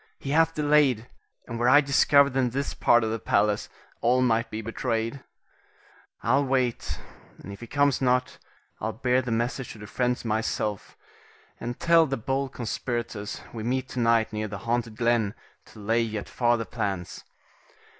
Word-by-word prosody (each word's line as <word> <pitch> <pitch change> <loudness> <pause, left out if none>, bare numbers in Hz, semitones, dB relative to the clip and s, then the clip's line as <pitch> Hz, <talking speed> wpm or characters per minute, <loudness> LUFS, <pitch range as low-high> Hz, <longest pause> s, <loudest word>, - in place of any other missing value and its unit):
he 135 - -5
hath 165 +1 +3
delayed, 145 -6 +3 0.4
and 115 -1 -6
were 120 +1 +3
I 145 +3 +8
discovered 140 -1 +4
in 130 -2 +2
this 140 +4 -3
part 120 0 +4
of 110 - -1
the 115 - -2
palace, 105 0 +1 0.3
all 125 +2 +3
might 115 -1 +1
be 110 - -5
betrayed. 115 +2 -2 1.0
I'll 135 +4 +3
wait, 130 -3 -1 0.4
and 100 - -9
if 100 - -11
he 120 - -9
comes 145 +1 +2
not, 125 +1 +1 0.4
I'll 110 +1 -3
bear 125 +2 +1
the 125 - -6
message 120 +3 -2
to - - -13
the 105 - -9
friends 125 +3 -1
myself, 110 -2 -2 0.6
and 120 +1 -5
tell 165 -1 +5
the 135 -1 -2
bold 135 +3 -2
conspirators 120 -3 -4
we 115 - -5
meet 130 +3 -1
to 125 - -4
night 115 -1 +2
near 110 0 -2
the 100 -1 -6
haunted 115 -2 -1
glen, 115 -3 +1 0.3
to - - -15
lay 115 +3 +1
yet 110 -3 -3
farther 120 -2 +1
plans. 95 -5 -4
120 Hz, 165 wpm, -26 LUFS, 110-130 Hz, 1.0 s, I